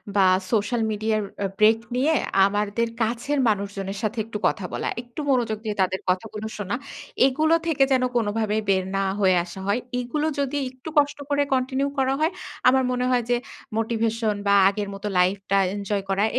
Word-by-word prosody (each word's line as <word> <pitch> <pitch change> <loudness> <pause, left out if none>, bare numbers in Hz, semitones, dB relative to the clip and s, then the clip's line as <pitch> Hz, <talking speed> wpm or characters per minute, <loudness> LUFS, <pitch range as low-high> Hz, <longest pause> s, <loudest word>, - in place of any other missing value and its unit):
বা 195 - +5 0.3
সোশ্যাল 225 +1 +1
মিডিয়ার 215 0 0 0.2
এ 195 - +1
ব্রেক 220 +1 +6 0.2
নিয়ে 280 +6 +2 0.3
আমাদের 205 +3 0
কাছের 240 +6 0
মানুষজনের 195 -1 -2
সাথে 215 +2 -1
একটু 220 -1 -5
কথা 190 - -2
বলা, - - -2
একটু 240 +3 -11
মনোযোগ 240 -5 +1
দিয়ে 210 -1 -2
তাদের 190 0 +1
কথাগুলো 210 +3 -2
শোনা। 205 +1 -2 0.5
এগুলো 310 +4 +2
থেকে 295 -4 +3
যেন 260 -1 +3
কোনোভাবেই 220 -1 0
বের 190 -1 +3
না 195 - +1 0.2
হয়ে 190 -2 +4
আসা 175 +2 -9
হয়। 200 +4 +2 0.2
এইগুলো 295 +5 -2
যদি 280 0 -1 0.2
একটু 260 +4 -9
কষ্ট 290 0 +3
করে 285 0 +2
কন্টিনিউ 265 +2 0
করা 265 0 +2
হয় 315 +2 +2 0.4
আমার 260 +1 +5
মনে 250 0 0
হয় 245 -1 +2
যে 245 - +4 0.4
মোটিভেশন 225 -1 0
বা 200 - +5 0.2
আগের 205 0 -3
মতো 195 +1 -5
লাইফটা 195 +2 +2 0.2
এনজয় 200 0 -2
করাটা 195 +2 +2
220 Hz, 170 wpm, -24 LUFS, 200-255 Hz, 0.5 s, ব্রেক